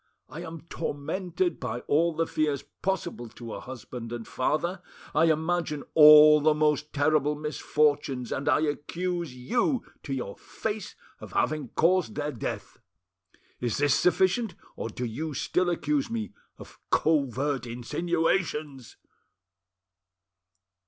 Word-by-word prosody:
I 150 +5 -7
am 165 -2 -7
tormented 175 +4 -3
by 120 -1 -4
all 165 +5 +2
the 165 - +1
fears 150 -4 -1 0.2
possible 170 -10 -2
to 115 0 -9
a - - -5
husband 120 -2 -8
and 120 -2 -6
father; 170 +7 -1 0.3
I 160 +2 +4
imagine 160 -1 0
all 150 0 +9
the 155 +1 +4
most 150 0 +1
terrible 150 0 +2
misfortunes, 145 -4 0
and 140 - -1
I - - +4
accuse 170 0 -2
you 240 - 0 0.2
to 140 - -8
your 110 -6 -5
face 215 -1 -5 0.2
of - - -11
having 155 -3 0
caused 175 -8 +2
their 150 +1 -2
death! 120 - -6 0.8
Is 120 -3 -1
this 145 -1 +3
sufficient, 190 +6 +2 0.2
or - - -4
do 125 +3 -4
you 145 +6 -4
still 180 +6 +1
accuse 275 - 0
me 230 -1 -4 0.2
of - - -13
covert 140 -3 +1
insinuations?" 150 +2 -2
150 Hz, 125 wpm, -27 LUFS, 135-170 Hz, 0.8 s, all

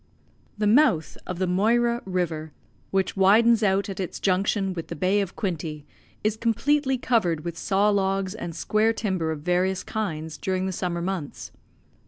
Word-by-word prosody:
The 210 - 0
mouth 210 - +3
of 180 - -4
the 185 - 0
Moira 235 +6 +2
River, 165 -5 -2 0.4
which 195 -1 0
widens 220 +4 +5
out 195 -1 +2
at 195 -1 -6
its 185 - -4
junction 195 +1 +1
with 165 -2 -6
the - - -6
Bay 190 +6 +2
of 195 -2 -5
Quinte, 155 -6 -4 0.4
is 215 0 +1
completely 265 +4 +1
covered 180 -11 0
with 170 -1 -4
saw 200 +4 +2
logs 195 -1 0
and 175 -7 -6
square 215 +5 +1
timber 190 -8 -1
of 155 -2 -5
various 180 +3 0
kinds 160 -7 -4
during 185 0 -1
the 190 - -1
summer 175 -1 -3
months. 180 -6 -4
190 Hz, 165 wpm, -25 LUFS, 175-215 Hz, 0.4 s, widens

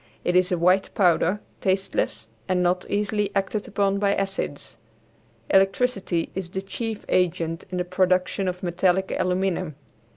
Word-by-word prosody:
It 175 - 0
is 185 +1 +4
a 180 - +2
white 180 +3 +3
powder, 185 +1 +3 0.2
tasteless, 190 - -1 0.2
and 180 -1 +1
not 180 +1 0
easily 205 0 0
acted 200 +2 -1
upon 200 0 +1
by 200 0 +2
acids. 195 0 -3 0.8
Electricity 195 -3 +2
is 185 -2 -4
the 190 +2 -4
chief 220 +2 -5
agent 165 -2 0
in 185 - -4
the 180 - -1
production 185 +1 +1
of 180 0 -3
metallic 185 +2 +1
aluminum. 185 -3 0
185 Hz, 140 wpm, -24 LUFS, 180-195 Hz, 0.8 s, is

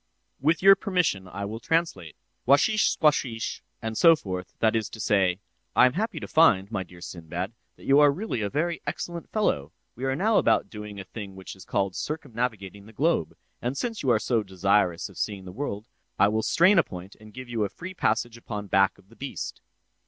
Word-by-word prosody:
With 160 +5 +1
your 195 0 +9
permission, 180 - 0
I 100 +2 -5
will 110 +3 -5
translate. 115 - -1 0.3
'Washish 175 - +4
squashish,' 130 -7 0 0.2
and 110 0 -3
so 165 +7 +7
forth:—that 100 - -2
is 110 -3 -1
to 110 - -10
say, 95 -3 +2 0.3
'I - - +7
am 125 - +3
happy 205 0 -2
to - - -7
find, 105 -11 +4
my 100 -4 -1
dear 90 -1 -11
Sinbad, 85 +3 -5 0.2
that - - -16
you 140 +1 +5
are 145 -1 +7
really 180 - -3
a 100 - -1
very 165 +6 -1
excellent 170 -1 -5
fellow; 80 - 0 0.2
we 125 - -9
are 135 0 0
now 210 +8 +3
about - - +2
doing 105 -2 -8
a - - -5
thing 100 0 -8
which 95 0 -9
is 95 - -13
called 100 -2 -1
circumnavigating 115 -9 -4
the 110 - -14
globe; 145 - 0 0.3
and 125 +3 -2
since 230 +2 -3
you 135 - 0
are 120 - +5
so 110 +1 +1
desirous 95 -2 +1
of - - -12
seeing 100 -3 -3
the 90 - -8
world, 105 -3 -4 0.3
I 100 - +5
will 110 +1 0
strain 185 - +5
a - - +5
point 90 +1 -10
and 110 0 -14
give 130 +3 -9
you 115 -3 -1
a 100 - -1
free 185 - -8
passage 115 -6 0
upon 105 -3 -6
back 95 0 +3
of 95 - -23
the 115 - -18
beast. 135 +2 -6
110 Hz, 205 wpm, -26 LUFS, 95-150 Hz, 0.3 s, your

